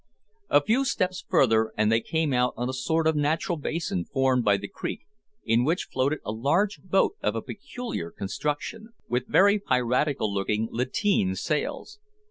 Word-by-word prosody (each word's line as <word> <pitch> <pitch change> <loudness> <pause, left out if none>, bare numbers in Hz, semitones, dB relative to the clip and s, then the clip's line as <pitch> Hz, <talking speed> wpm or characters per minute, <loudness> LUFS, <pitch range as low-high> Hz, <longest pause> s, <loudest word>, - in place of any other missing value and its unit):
A 145 - +5
few 235 - +2
steps 185 -8 -1
further 110 -3 +3
and 105 +1 +3
they 115 0 +3
came 160 -1 -1
out 125 0 +1
on 120 - -2
a 130 - -3
sort 160 +5 0
of 160 0 +3
natural 155 +4 0
basin 150 - -2
formed 130 +3 +1
by 100 -2 +4
the 100 +1 -6
creek, - - -5 0.4
in 115 +2 +3
which 165 +7 0
floated 140 +4 0
a - - -2
large 160 - 0
boat 190 +1 +2
of 105 - 0
a 115 - -2
peculiar 140 - -6
construction, 150 - -4
with 125 +1 -1
very 200 +2 +5
piratical 125 - 0
looking 105 +3 0
lateen 125 - 0
sails. 150 - -3
135 Hz, 165 wpm, -26 LUFS, 115-165 Hz, 0.4 s, A